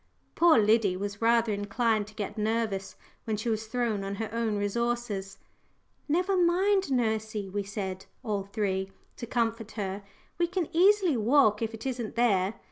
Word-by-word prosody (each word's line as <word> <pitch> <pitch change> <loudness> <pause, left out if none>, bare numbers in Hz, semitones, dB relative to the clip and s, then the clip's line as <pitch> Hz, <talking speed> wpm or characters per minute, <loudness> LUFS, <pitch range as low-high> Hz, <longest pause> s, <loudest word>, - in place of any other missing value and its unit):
Poor 335 -5 +5
Liddy 210 -3 +3
was 205 +2 -5
rather 230 -1 +3
inclined 210 +1 0
to 215 - -15
get 210 -3 -4
nervous 215 -3 -1 0.3
when 220 -2 -1
she 220 +3 -2
was 220 0 -2
thrown 225 -3 -1
on 195 +1 -4
her 220 +1 -4
own 230 -2 0
resources. 205 -2 -2 0.7
"Never 360 +5 +2
mind, 370 0 +2
nursey," 220 -4 -1
we 200 +2 -2
said, 195 -2 -5 0.2
all 210 -4 -1
three, 195 -2 -2 0.3
to 235 - -6
comfort 230 -2 -1
her; 200 -2 -4 0.4
"we 345 - +3
can 360 -2 -2
easily 370 -4 +4
walk 225 -2 +4
if 225 0 -2
it 225 - -10
isn't 245 -4 -3
there. 205 -4 +2
220 Hz, 160 wpm, -28 LUFS, 205-240 Hz, 0.7 s, Poor